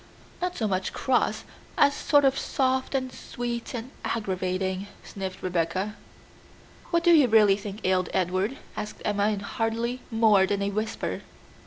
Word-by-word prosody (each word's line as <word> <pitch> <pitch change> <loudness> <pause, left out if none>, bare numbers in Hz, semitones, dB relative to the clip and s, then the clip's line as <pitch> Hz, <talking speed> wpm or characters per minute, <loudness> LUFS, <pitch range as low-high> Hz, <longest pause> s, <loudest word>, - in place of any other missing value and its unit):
"Not 360 0 -2
so 220 - 0
much 185 -1 -1
cross, 260 -2 +1 0.3
as 285 0 +5
sort 290 0 +3
of 270 0 +4
soft, 260 0 0
and 260 -1 -1
sweet, 240 0 -5
and 240 +3 -6
aggravating," 190 -2 -2 0.2
sniffed 190 -2 -6
Rebecca. 185 +3 -1 0.9
"What 340 -1 +2
do 345 - +6
you 295 -6 +6
really 215 -3 +6
think 205 +1 -7
ailed 185 -1 +2
Edward?" 190 +7 0 0.2
asked 210 0 -6
Emma 205 0 +2
in 205 -2 -2
hardly 230 +4 -2
more 220 -4 +4
than 200 0 0
a 200 - 0
whisper. 215 +2 -3
215 Hz, 150 wpm, -27 LUFS, 190-250 Hz, 0.9 s, do